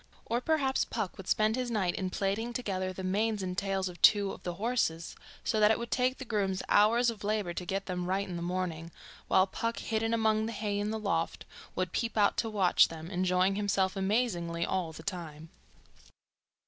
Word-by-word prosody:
Or 235 +2 -1
perhaps 275 -3 +1
Puck 215 -5 -3
would 190 - -10
spend 215 +1 +2
his 250 -1 -2
night 195 -6 0
in 185 -1 -2
plaiting 200 +6 -1
together 190 -6 -2
the 190 +1 -7
manes 205 +2 0
and 180 -1 -3
tails 195 0 -1
of 180 -1 -9
two 205 -2 +6
of - - -9
the 175 -1 -4
horses, 195 -6 -1 0.3
so 220 - 0
that 210 0 +6
it 220 - +3
would 235 0 -6
take 255 +1 +1
the 265 - -7
grooms 195 -4 -1
hours 230 +3 +5
of 210 -2 -10
labour 205 -4 -1
to 180 - -5
get 195 +1 -2
them 180 -1 -3
right 195 +2 0
in 180 - -5
the 170 - -4
morning, 170 -2 -3 0.4
while 185 - +5
Puck, 230 +4 -3
hidden 225 0 -1
among 220 -1 +2
the 230 - -4
hay 205 -1 -2
in 205 +1 -1
the 220 - -2
loft, 185 -6 -2 0.3
would 185 -1 -1
peep 230 -1 -2
out 205 -1 +4
to 225 - 0
watch 195 -4 +4
them, 165 +2 -8
enjoying 185 +1 +2
himself 200 -1 0
amazingly 190 -5 0
all 180 -4 -1
the 155 - -10
time. 165 -5 -6
195 Hz, 205 wpm, -30 LUFS, 185-220 Hz, 0.4 s, two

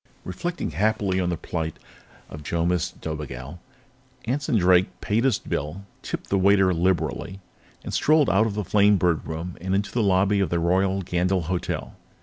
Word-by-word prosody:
Reflecting 170 - -4
happily 95 +2 0
on 90 -1 0
the 85 - -2
plight 80 -1 -4 0.5
of 75 - -9
Jomis 85 +3 0
Dobigel, 75 0 -7 0.7
Anson 130 0 0
Drake 90 -1 +3
paid 115 +4 0
his 135 - +3
bill, 85 +7 -4 0.2
tipped - - -6
the 100 - +3
waiter 95 -1 +4
liberally, 85 +1 -1 0.4
and - - -6
strolled 155 -1 +4
out 110 +3 +3
of 100 - -4
the 105 - -1
Flamebird 100 -4 +3
Room 80 +3 -5
and 95 +2 -1
into 100 +1 -1
the 120 - 0
lobby 100 0 +3
of 95 - +1
the 85 - 0
Royal 95 +3 +1
Gandyll 90 +1 0
Hotel. 90 +2 -3
95 Hz, 160 wpm, -24 LUFS, 85-100 Hz, 0.7 s, waiter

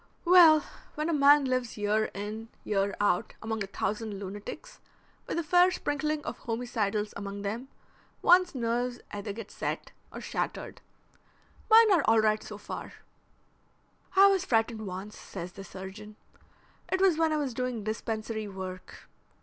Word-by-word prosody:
"Well, 340 -3 +8 0.3
when 305 +2 -1
a - - +1
man 285 0 +6
lives 255 -3 -1
year 210 +1 +1
in 215 +3 -5
year 200 -1 0
out 205 -3 +1
among 220 -1 -3
a - - -6
thousand 210 +2 -3
lunatics, 205 - -8 0.5
with - - -3
a 340 - 0
fair 355 +3 +5
sprinkling 305 -3 -2
of - - -5
homicidals 220 -3 -2
among 200 0 -6
them, 225 +6 -4 0.6
one's 360 -2 +5
nerves 245 0 -1
either 205 0 -5
get 215 0 -8
set - - -4 0.2
or - - -7
shattered. - - -4 0.9
Mine 445 -1 +8
are 345 -7 +4
all 225 +1 +5
right 215 0 +2
so 210 - -8
far." 205 - -7 1.2
"I 390 +1 +8
was 390 -2 +4
frightened 225 - 0
once," 190 +3 -6
says 180 -2 -7
the 195 +2 -10
surgeon. 195 +3 -9 0.8
"It 375 - +1
was 375 -4 +4
when 325 -1 +3
I 310 - +1
was 280 -4 -2
doing 250 -2 -3
dispensary 220 0 -3
work. 185 -1 -8
225 Hz, 150 wpm, -29 LUFS, 205-295 Hz, 1.2 s, Well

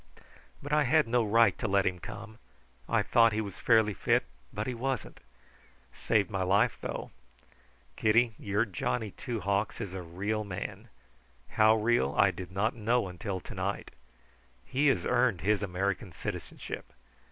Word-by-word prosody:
But 145 +1 -4
I 150 -1 +4
had 155 +2 +3
no 120 0 +2
right 115 +2 +4
to - - -1
let 100 -1 +2
him 90 -1 -1
come. 115 +4 -9 0.5
I - - +2
thought 115 -1 +4
he 110 - 0
was 100 -4 -5
fairly 110 -3 +4
fit, - - +2 0.3
but 105 +1 -3
he 130 - -2
wasn't. 125 0 -3 0.7
Saved 110 0 +1
my 100 -2 -1
life, 95 +2 +3
though. - - -5 0.8
Kitty, 115 +1 +3
your 105 +3 0
Johnny 105 +2 -2
Two 115 +1 -5
Hawks 100 +3 -1
is 100 -5 -5
a 95 - -4
real 100 +6 -3
man; 95 -3 -6 0.6
how 110 0 +5
real 110 - +1
I 100 -1 +5
did 90 0 -8
not 105 +5 0
know 115 0 +1
until 95 +2 -4
to - - -9
night. - - -3 0.7
He 140 - +1
has 135 - +2
earned 110 -10 +2
his 105 +3 +1
American 95 0 -2
citizenship. - - -6
105 Hz, 160 wpm, -30 LUFS, 95-115 Hz, 0.8 s, how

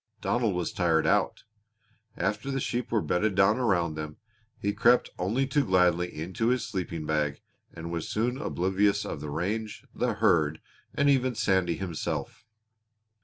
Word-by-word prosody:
Donald 115 -5 0
was 90 -2 -2
tired 85 -3 +2
out. - - +1 0.7
After 110 +5 -1
the 135 0 -1
sheep 125 -1 -2
were 110 -3 +1
bedded 100 +3 0
down 100 +4 +4
around 90 -9 +1
them, 75 0 -6 0.4
he 100 0 -1
crept 120 +4 +4
only 110 +9 +1
too 140 +2 +1
gladly 90 -3 +2
into 90 +8 -3
his 125 -2 +1
sleeping 85 -6 -4
bag 75 -2 0 0.3
and 85 +1 -7
was 85 -2 -3
soon 125 +5 -1
oblivious 100 - +1
of 70 - -5
the 75 - -5
range, 105 +8 -3
the - - -1
herd, 80 -2 +2 0.4
and 140 - +2
even 130 -3 +3
Sandy 95 -5 +1
himself. 95 +5 -4
95 Hz, 155 wpm, -28 LUFS, 85-115 Hz, 0.7 s, down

